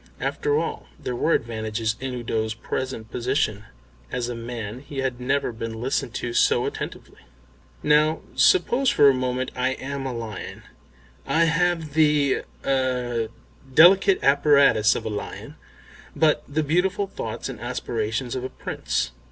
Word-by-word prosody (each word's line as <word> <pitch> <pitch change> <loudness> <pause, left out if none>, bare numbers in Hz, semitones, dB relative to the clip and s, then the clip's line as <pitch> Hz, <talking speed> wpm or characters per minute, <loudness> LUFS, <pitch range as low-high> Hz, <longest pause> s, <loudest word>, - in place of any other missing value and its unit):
After 440 0 0
all - - -3
there 125 - -4
were 160 +7 +1
advantages 110 -1 -1
in 130 -1 -4
Udo's 110 -2 -2
present 115 -1 -4
position. 120 -4 -1 0.5
As 125 -1 -2
a - - -3
man 115 -1 -6
he 140 +1 -10
had 130 -2 -2
never 135 +1 0
been 115 0 -6
listened 130 0 -2
to 120 - -3
so - - +3
attentively. - - -6 0.6
"Now 155 +2 +3
suppose 275 -8 +4
for 145 - +5
a - - +4
moment 130 0 -2
I 130 +1 0
am 135 +1 -5
a - - -3
lion. 110 -4 -7 0.6
I 165 - +3
have 165 -2 +1
the 150 -3 +3 0.2
er 125 -4 0 0.4
delicate 185 +6 +7
apparatus 140 -6 +5
of - - -4
a - - -1
lion, 105 -1 -6 0.6
but 155 -2 +3
the 155 +2 -1
beautiful 180 +6 +1
thoughts - - -5
and - - -7
aspirations 115 +3 -3
of 130 - -3
a 130 - -3
Prince. - - -3
130 Hz, 145 wpm, -24 LUFS, 115-150 Hz, 0.6 s, delicate